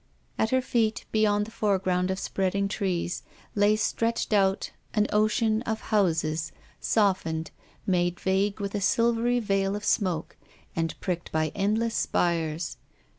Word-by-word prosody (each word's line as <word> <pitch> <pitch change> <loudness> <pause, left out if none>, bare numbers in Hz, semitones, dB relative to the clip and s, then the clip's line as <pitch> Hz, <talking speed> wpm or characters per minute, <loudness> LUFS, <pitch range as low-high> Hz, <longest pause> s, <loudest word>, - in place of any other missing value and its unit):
At 220 - +2
her 260 +1 +2
feet, 230 -3 0
beyond 210 -1 +2
the 225 - -11
fore 210 -3 +1
ground 185 -1 0
of 190 - -1
spreading 195 +1 0
trees, 185 -3 -2 0.3
lay 205 +1 +4
stretched 230 +1 0
out 195 -1 +2 0.2
a 210 - +4
vast 210 - 0
ocean 215 +1 +2
of 220 -3 -2
houses, 160 -6 +1 0.3
softened, 165 -7 +1 0.3
made 175 -2 +1
vague 195 +2 +1
with 200 -1 -3
a 205 - -1
silvery 235 +3 +2
veil 195 -2 0
of 210 0 -5
smoke, 175 -5 0 0.4
and 165 -1 -2
pricked 175 -3 -3
by 155 -1 0
endless 220 +3 0
spires. 165 -1 0
200 Hz, 145 wpm, -27 LUFS, 180-215 Hz, 0.4 s, lay